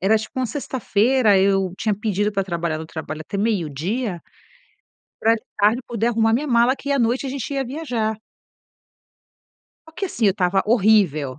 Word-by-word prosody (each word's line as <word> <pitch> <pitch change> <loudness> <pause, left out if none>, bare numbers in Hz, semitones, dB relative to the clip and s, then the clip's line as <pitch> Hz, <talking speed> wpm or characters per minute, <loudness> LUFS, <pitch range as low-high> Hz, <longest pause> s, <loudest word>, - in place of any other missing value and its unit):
Era 200 +4 +3
tipo 220 +4 -7
uma 255 - 0
sexta-feira, 230 -3 +1
eu 195 -1 +2
tinha 215 -2 0
pedido 205 0 -1
para 195 -1 -1
trabalhar 170 -3 -2
no 160 - -7
trabalho 155 -1 -6
até 180 - -6
meio-dia 195 - -2 1.0
para 225 +1 +4
de 220 - -7 0.2
tarde 215 +4 +3
poder 230 -1 -1
arrumar 225 -1 +2
minha 285 +6 -1
mala, 240 0 +3
que 280 - -6
à 280 - +1
noite 240 +3 +1
a 265 - -3
gente 275 0 -5
ia 270 -1 -1
viajar. 245 -6 -3 1.7
Só 320 - -15
que 390 +4 -3
assim, 235 -10 -1
eu 195 - +6
estava 190 0 +1
horrível. 195 - +2
220 Hz, 175 wpm, -21 LUFS, 190-245 Hz, 1.7 s, eu